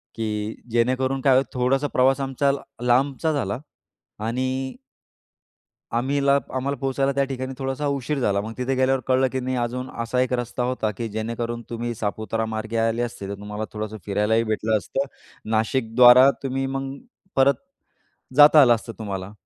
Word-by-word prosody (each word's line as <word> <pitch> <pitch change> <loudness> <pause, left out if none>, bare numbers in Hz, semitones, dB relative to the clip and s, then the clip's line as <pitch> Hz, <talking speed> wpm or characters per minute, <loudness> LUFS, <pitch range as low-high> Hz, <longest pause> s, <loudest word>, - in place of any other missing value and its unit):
की 110 -1 -3 0.2
जेणेकरून 130 +3 +1
काय 135 -1 +4
होईल 130 - +4
थोडासा 135 +3 +1
प्रवास 130 +2 +3
आमचा 135 +1 +1
ल 140 - -2 0.3
लांबचा 140 +5 +2
झाला. 120 -4 -2 0.6
आणि 130 +4 -2 1.2
आम्हीला 140 +3 +2 0.2
आम्हाला, 135 +2 -1
पोहोचायला 135 +1 0
त्या 140 0 +2
ठिकाणी 130 -1 -4
थोडासा 135 +2 -2
उशीर 140 +1 -1
झाला. 100 -5 +1
मग 110 +2 -6
तिथे 130 +1 0
गेल्यावर 130 0 +2
कळलं 130 0 +3
की 130 - -1
नाही 130 0 -2
अजून 125 +2 -3
असा 125 +2 -1
एक 130 0 0
रस्ता 120 0 -2
होता 125 -3 -1
की 115 -1 -3
जेणेकरून 115 +2 -4
तुम्ही 120 0 -3
सापुतारा 110 +1 -2
मार्गे 110 +1 -4
आले 115 +1 +1
असते, 115 -5 -5
तर 100 - -3
तुम्हाला 105 +2 -5
थोडंसं 110 0 -5
फिरायलाही 105 +3 +2
भेटलं 110 0 0
असतं, 135 +7 -3 0.4
नाशिकद्वारा 125 +3 +6
तुम्ही 135 0 -1
मग 135 0 -3 0.4
परत 135 +1 +5 0.8
जाता 150 0 +9
आलं 120 -2 +6
असतं 115 +1 -6
तुम्हाला. 100 -2 -5
125 Hz, 155 wpm, -23 LUFS, 110-135 Hz, 1.2 s, जाता